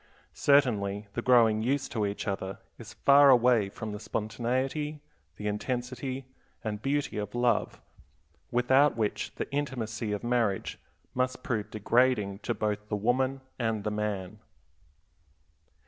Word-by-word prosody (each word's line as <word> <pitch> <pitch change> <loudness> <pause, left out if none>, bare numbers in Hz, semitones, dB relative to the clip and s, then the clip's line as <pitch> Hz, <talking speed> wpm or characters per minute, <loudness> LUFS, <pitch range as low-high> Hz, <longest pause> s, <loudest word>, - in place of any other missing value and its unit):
Certainly 105 -8 +2
the 120 - -2
growing 115 -4 +4
used 135 +4 -1
to 110 -3 0
each 100 +2 -5
other 95 -1 -3 0.2
is - - -10
far 140 0 +6
away 120 -5 +5
from 110 +2 -6
the 105 - -6
spontaneity, 130 +8 -2 0.4
the 105 - -8
intensity, 125 +4 -3 0.4
and 105 -2 -3
beauty 140 -3 -1
of 105 +2 -5
love, 120 -2 +1 0.7
without 130 +3 +3
which 110 -2 -2
the - - -3
intimacy 120 -6 -3
of 105 +1 -3
marriage 120 -5 0 0.3
must 125 0 -1
prove 110 -3 -2
degrading 110 -2 +1
to 120 - -2
both 105 0 -2
the 105 - 0
woman 130 +5 0 0.2
and 115 -3 -1
the 105 - -1
man. 105 -3 -3
115 Hz, 130 wpm, -29 LUFS, 105-130 Hz, 0.7 s, far